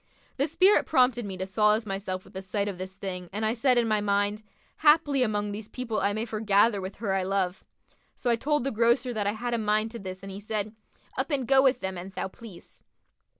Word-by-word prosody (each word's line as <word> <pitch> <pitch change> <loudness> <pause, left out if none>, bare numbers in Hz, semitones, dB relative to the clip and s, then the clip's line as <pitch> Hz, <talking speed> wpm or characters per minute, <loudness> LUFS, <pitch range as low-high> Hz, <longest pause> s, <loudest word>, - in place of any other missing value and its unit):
The 280 +2 +1
spirit 370 +6 +4
prompted 250 -3 +3
me 190 -2 -6
to 185 - -3
solace 210 +3 +2
myself 195 -2 -4
with - - -17
the 190 - -5
sight 200 +2 -2
of 195 -3 -5
this 190 0 -6
thing 180 -3 -6
and 215 +3 -2
I 220 - +2
said 250 +1 +2
in 235 -1 +3
my 215 -1 +2
mind, 205 +1 0 0.4
'Haply 295 -3 +4
among 210 -3 0
these 210 +1 -6
people 235 -4 -3
I 200 +1 +1
may 215 +2 -2
foregather 215 -1 +2
with 190 +1 -6
her 205 -3 -2
I 190 - +1
love.' 185 -1 -1 0.5
So 245 - -1
I - - +4
told 295 +3 0
the 275 - -1
grocer 235 +3 +2
that 210 -3 -1
I 205 - +1
had 240 +2 -3
a 235 - +1
mind 215 +1 +1
to 235 - -7
this 185 0 -8
and 195 - -7
he 195 - -7
said, 215 0 -3 0.5
'Up - - -1
and 270 -5 -1
go 270 0 +6
with 265 -2 +3
them 190 -1 -3
an 190 +2 -9
thou - - -3
please.' 210 -3 -14
215 Hz, 235 wpm, -27 LUFS, 195-240 Hz, 0.5 s, go